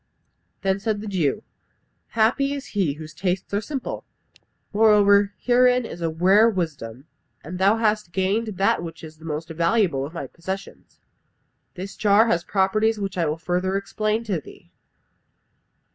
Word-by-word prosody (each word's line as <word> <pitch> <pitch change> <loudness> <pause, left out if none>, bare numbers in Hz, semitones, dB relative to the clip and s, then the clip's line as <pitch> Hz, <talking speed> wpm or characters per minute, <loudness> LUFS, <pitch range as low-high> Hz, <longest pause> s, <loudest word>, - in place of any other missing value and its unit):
Then 195 0 +1
said 215 0 -1
the 215 - -7
Jew, 170 -9 0 0.7
"Happy 265 +6 +2
is 280 - -6
he 190 -9 +1
whose 155 +1 -10
tastes 185 +3 -2
are 205 - +1
simple! 270 +3 -5 0.7
Moreover, 205 -2 +5
herein 250 0 +3
is 175 - -8
a 165 - 0
rare 190 +7 +4
wisdom, 140 - -4 0.4
and 180 +5 -7
thou 200 +4 +4
hast 215 -4 0
gained 200 +3 -1
that 195 -2 +2
which 165 -1 -8
is 155 -1 -11
the 160 - -13
most 160 +1 -4
valuable 170 -3 +1
of 150 +5 -7
my - - -4
possessions. 190 +3 -8 0.8
This 190 +2 -7
jar 210 +1 +4
has 175 -7 +1
properties 215 +4 +1
which 195 -2 -3
I 170 -3 0
will 150 +1 -1
further 180 +3 -1
explain 215 +3 -1
to 195 -8 -2
thee. - - -16
195 Hz, 155 wpm, -23 LUFS, 170-215 Hz, 0.8 s, Moreover